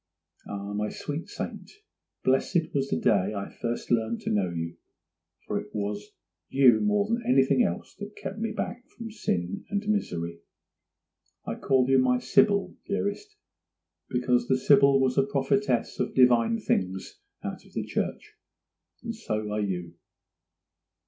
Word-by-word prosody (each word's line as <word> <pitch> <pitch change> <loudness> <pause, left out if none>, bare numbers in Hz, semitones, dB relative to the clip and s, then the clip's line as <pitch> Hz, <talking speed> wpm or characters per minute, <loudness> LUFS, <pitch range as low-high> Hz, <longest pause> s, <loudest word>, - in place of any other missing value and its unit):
Ah, 100 0 -5
my 105 +1 -1
sweet 150 +3 -5
saint, - - -6 0.5
blessed 160 +6 +1
was 135 -1 0
the 80 - 0
day 100 +4 +2
I 100 0 -5
first 120 0 -3
learned 115 -1 +1
to - - -2
know 100 -4 +1
you! 85 0 -4 0.7
for - - -1
it - - -11
was 105 0 -3 0.4
you 130 -5 +6
more 210 -1 +2
than 230 +2 0
anything 130 0 +4
else 85 - -1
that 205 0 -7
kept 205 - -6
me 225 0 -1
back 245 +2 -4
from 230 -1 -6
sin 90 - -2
and 205 0 -2
misery. 85 - -1 1.1
I - - -2
call 130 -2 +2
you 135 0 +5
my 125 -1 +3
Sibyl, 205 +7 +3
dearest, 205 - -2 0.7
because 125 -1 +1
the 130 - +3
Sibyl 140 +1 +5
was 130 0 +2
a - - +5
prophetess 140 - 0
of - - -1
divine 125 - +5
things 95 - -2 0.2
out - - -5
of - - -20
the - - -2
church; - - -3 0.7
and - - -3
so 110 -1 -3
are 105 0 0
you. 90 -4 -3
130 Hz, 150 wpm, -27 LUFS, -, 1.1 s, you